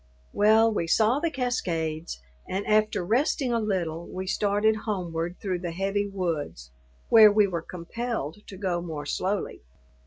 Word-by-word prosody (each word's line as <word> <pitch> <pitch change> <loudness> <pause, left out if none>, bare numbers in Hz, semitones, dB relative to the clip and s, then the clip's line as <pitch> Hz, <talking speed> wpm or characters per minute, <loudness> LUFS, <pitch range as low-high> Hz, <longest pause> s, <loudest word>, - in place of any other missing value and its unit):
Well, 220 +2 +4
we 170 -5 -1
saw 220 - +3
the 335 +2 0
cascades, 170 - -2 0.3
and 195 +2 -3
after 215 -4 +2
resting 250 - +1
a 230 - +2
little, 175 -6 -2
we 185 +1 -5
started 205 +3 +1
homeward 175 -4 -2
through 185 -3 -2
the 175 -1 -4
heavy 195 +3 -1
woods, 165 - -4 0.4
where 220 -2 +8
we 210 0 +4
were 175 -4 -3
compelled 180 - -5
to 190 - -9
go 180 -3 -1
more 155 -4 -6
slowly. 190 +6 -2
195 Hz, 150 wpm, -26 LUFS, 170-215 Hz, 0.4 s, where